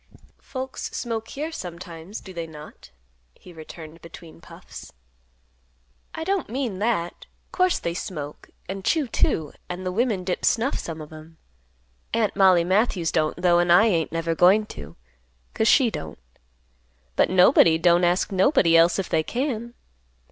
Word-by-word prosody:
"Folks 260 -1 -6
smoke 225 -2 -4
here, 305 +4 -5
sometimes, 175 - -8
do 190 - -11
they 170 -2 -5
not?" 150 - -13 0.5
he 180 - -15
returned 160 0 -11
between 170 -1 -13
puffs. - - -12 1.2
"I 320 - -4
don't 390 +1 -1
mean 240 -6 -3
that. 205 -6 -2 0.2
Course 365 -1 +2
they 170 - -3
smoke 150 -4 -7 0.2
and 190 +1 -6
chew, 310 - +1
too. 160 -8 0 0.2
And 180 +1 -6
the 185 - -1
women 215 -2 0
dip 180 0 -3
snuff, 240 +4 +1
some 160 -1 -6
of 155 +1 -11
'em. 155 +1 -13 0.8
Aunt 225 -3 0
Mollie 185 -3 +5
Matthews 185 -2 +1
don't, 155 +1 0
though, 175 -1 +3
and 175 0 +2
I 180 +6 +7
ain't 170 -8 +1
never 165 0 -1
goin' 190 +6 +4
to, 75 +2 -10 0.6
'cause 220 - 0
she 245 -2 +5
don't. 80 - -7 1.0
But - - +3
nobody 180 -3 +5
don't 175 +1 +3
ask 175 +3 +1
nobody 190 - +3
else 165 +1 +5
if 195 - -2
they 160 - +1
can. 240 - -3
180 Hz, 155 wpm, -24 LUFS, 165-225 Hz, 1.2 s, I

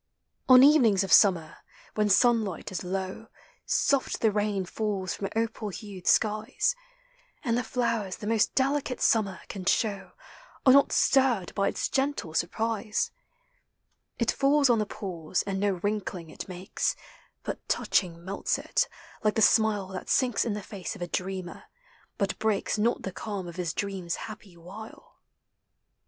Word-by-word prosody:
On 255 0 +9
evenings 245 -10 +5
of 190 - 0
summer, 175 -6 +4 0.4
when 210 -1 +1
sunlight 215 -3 +2
is 190 - -4
low. 190 +4 -4 0.4
Soft 275 -2 +1
the 220 - +4
rain 205 -2 -1
falls 195 -1 -2
from 195 - -4
opal 225 -1 -2
hued 200 -2 -9
skies: 220 - +2 0.7
And 235 -5 +1
the 245 - 0
flowers 230 -5 -1
the - - -8
most 220 0 +1
delicate 275 -1 0
summer 200 -4 +1
can 195 - -7
show 200 0 0 0.5
Are 260 - +8
not 280 0 +5
stirred 250 -10 +2
by 200 -1 +1
its - - -1
gentle 270 - -1
surprise. 215 +5 -1 1.1
It 235 - +1
falls 275 -1 +3
on 230 - +3
the 210 - -1
pools, 180 -4 -3
and 195 -1 -3
no 200 0 +1
wrinkling 195 -5 -3
it - - -8
makes, 180 +1 -2 0.5
But - - -4
touching 170 -3 0
melts 195 +1 -1
in. - - -9 0.6
like 215 -1 +2
the - - +1
smile 210 -3 +3
Thatsinks 245 +5 +1
in 225 - -1
the 210 -1 -5
face 195 0 -6
of 185 - -6
a - - -4
dreamer, 185 0 -4 0.5
bu1 200 -2 -2
breaks 215 -1 0
Not 230 +3 +1
the 190 - -4
calm 195 -1 -5
of 170 +1 -9
his 175 -3 -2
dream's 190 -4 -3
happy 210 -5 -10
Wtle. 195 +6 -11
205 Hz, 150 wpm, -27 LUFS, 190-230 Hz, 1.1 s, On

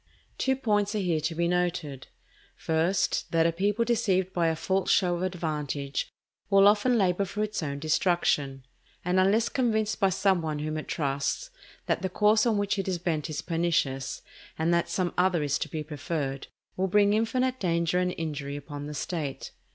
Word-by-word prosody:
Two 265 0 +2
points 210 -5 0
are - - +1
here 175 -6 0
to 160 +2 -2
be 170 +1 +1
noted. 175 -6 -1 0.5
First, 165 +4 0
that 165 -1 +3
a 170 - +3
people 205 +6 0
deceived 195 -6 +1
by 170 -2 +2
a 160 - +1
false 190 +3 -1
show 180 -3 +3
of - - -5
advantage 150 -6 -3 0.4
will 195 0 +6
often 215 +4 +4
labour 190 -2 +2
for 200 +3 -3
its 215 -2 -3
own 140 -2 -3
destruction; 145 -4 0 0.4
and, 180 +1 +2
unless 205 +5 +3
convinced 220 -5 0
by 195 -2 +4
some 190 -1 +2
one 155 -2 -2
whom 155 +1 -3
it 155 - -6
trusts, 145 - -2 0.3
that - - 0
the 190 - -1
course 215 +4 +3
on 220 -3 +2
which 205 0 0
it 195 - -2
is 185 -2 0
bent 165 -3 -2
is 155 - -4
pernicious, 160 -6 -1 0.3
and 165 +2 +1
that 170 0 +1
some 180 -2 -1
other 180 -3 +2
is 145 -1 0
to - - -3
be 155 -2 -4
preferred, 145 -2 -4 0.3
will 190 +1 0
bring 205 +2 +4
infinite 255 +4 0
danger 170 -1 +1
and 180 0 0
injury 145 -3 -4
upon 145 0 -7
the 150 - -6
State. 145 -2 -4
175 Hz, 185 wpm, -27 LUFS, 155-200 Hz, 0.5 s, will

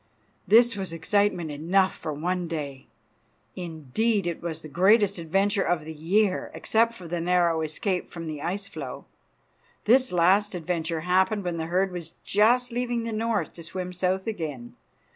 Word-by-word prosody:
This 235 +1 +6
was 190 -3 -4
excitement 175 0 0
enough 180 +6 +1
for 155 - -5
one 175 +4 -2
day. 145 -5 -5 0.7
Indeed, 180 - -1
it 170 -2 -3
was 165 -2 -5
the - - -7
greatest 195 +4 +3
adventure 195 +5 +1
of 170 -4 0
the 160 - -6
year, 185 +6 +1
except 230 +1 +2
for 180 -6 -10
the 170 0 -2
narrow 170 -2 +2
escape 180 +4 -2
from 170 -1 -7
the 155 -2 -5
ice 200 +5 -3
floe. 200 - -7 0.8
This 255 +3 +4
last 185 +4 +3
adventure 165 -1 -2
happened 190 +4 +2
when 175 -2 -2
the 160 0 -3
herd 185 +3 +1
was 170 -2 -7
just 240 +4 +3
leaving 240 -1 -1
the 230 -1 -4
north 225 0 -1
to 170 - -10
swim 180 +2 -6
south 185 +1 0
again. 155 - -5
180 Hz, 160 wpm, -26 LUFS, 165-205 Hz, 0.8 s, This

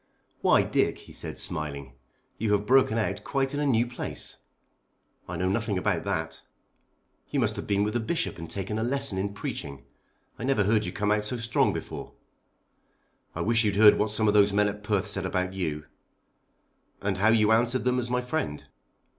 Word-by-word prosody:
"Why, - - +5
Dick," - - +1
he - - -14
said - - -4
smiling, 70 -3 -3 0.5
"you 105 -1 +1
have 105 0 +1
broken 130 -2 +4
out 100 -3 -1
quite 135 0 -1
in 145 - -2
a 145 - +1
new 120 -3 +3
place." 125 0 -6 0.9
"I 90 - -4
know 90 +2 0
nothing 105 +1 0
about 90 - 0
that." - - -3 0.9
"You - - 0
must - - +1
have - - -6
been 100 0 +2
with 105 +1 -1
the 120 - +1
Bishop 165 +9 -2
and 85 -1 -7
taken 100 +4 -2
a - - 0
lesson 135 -5 -1
in 100 +1 -3
preaching. 70 -8 -5 0.6
I - - -5
never 130 -5 +2
heard 105 +1 +2
you - - -3
come 105 +2 -1
out 105 0 +1
so 125 +3 -2
strong 115 -1 +2
before." - - -6 1.2
"I - - -3
wish 115 +1 +2
you'd 105 -2 +1
heard 105 0 +7
what 105 - +1
some 110 +1 +1
of 105 - +4
those 105 -1 +5
men 105 +1 +3
at 105 +1 -7
Perth 105 -1 0
said 100 -2 -2
about 90 0 -1
you." 80 -5 -3 1.2
"And 100 -2 -1
how 105 +3 +4
you 110 -1 +4
answered 120 +3 +2
them 125 0 +1
as 120 -1 -3
my 125 0 +1
friend." 125 - -3
105 Hz, 195 wpm, -27 LUFS, 95-120 Hz, 1.2 s, heard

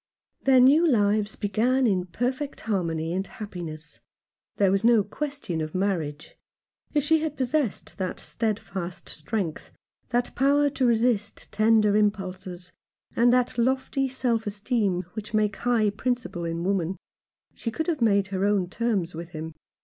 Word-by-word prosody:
Their 265 -1 +6
new 290 +7 +6
lives 210 -4 +2
began 235 +6 +1
in 185 -5 +1
perfect 255 - -3
harmony 170 -6 -1
and 190 +1 -2
happiness. 165 -8 -8 0.6
There 195 -2 +4
was 195 +2 +1
no 230 -2 +5
question 265 - -4
of 155 +2 -5
marriage. 170 -6 -2 0.6
If 295 - +3
she 320 +2 +3
had 310 -2 -3
possessed 260 -5 -1
that 185 -1 -3
steadfast 195 -5 -3
strength, 170 0 -3 0.4
that 245 0 0
power 285 +2 +3
to 260 -2 +1
resist 225 -3 0
tender 215 -1 +4
impulses, 190 -4 -1 0.4
and 240 +1 +5
that 250 -1 +2
lofty 265 +2 +1
self 240 -4 -1
esteem 205 -3 0
which 215 0 -5
make 210 -1 +1
high 230 -4 +2
principle 225 -5 -2
in 165 0 -3
woman, 190 -1 0 0.6
she 230 - -4
could 320 +8 -3
have 325 -7 -1
made 200 -4 +3
her 190 -1 -1
own 200 -3 +2
terms 200 -6 -1
with 170 +2 -8
him. 160 0 -6
210 Hz, 145 wpm, -26 LUFS, 185-245 Hz, 0.6 s, Their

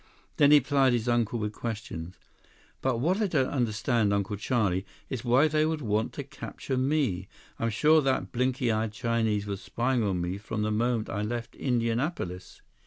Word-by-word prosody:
Then 145 - +6
he 150 0 +8
plied 135 -1 +3
his 120 0 -1
uncle 120 -1 +1
with 105 -1 -3
questions. 95 -7 -5 0.7
"But 130 -3 +1
what 175 - +1
I 210 - +2
don't 135 -8 +1
understand, 120 -3 +1
Uncle 100 0 0
Charlie, 100 -4 0 0.3
is 130 -4 -3
why 130 +5 +4
they 155 0 +2
would 155 -1 -1
want 110 0 0
to 140 - -5
capture 135 0 -6
me? 130 -9 0 0.3
I'm 115 - 0
sure 155 +8 +4
that 135 -2 0
blinky 125 0 +1
eyed 110 0 -1
Chinese 110 -3 0
was 100 -2 -4
spying 125 +1 0
on 95 -4 0
me 90 +3 -3
from 105 +1 -3
the 110 - 0
moment 115 +1 0
I 100 - -3
left 115 +2 -4
Indianapolis. 115 - -2
115 Hz, 175 wpm, -28 LUFS, 105-130 Hz, 0.7 s, he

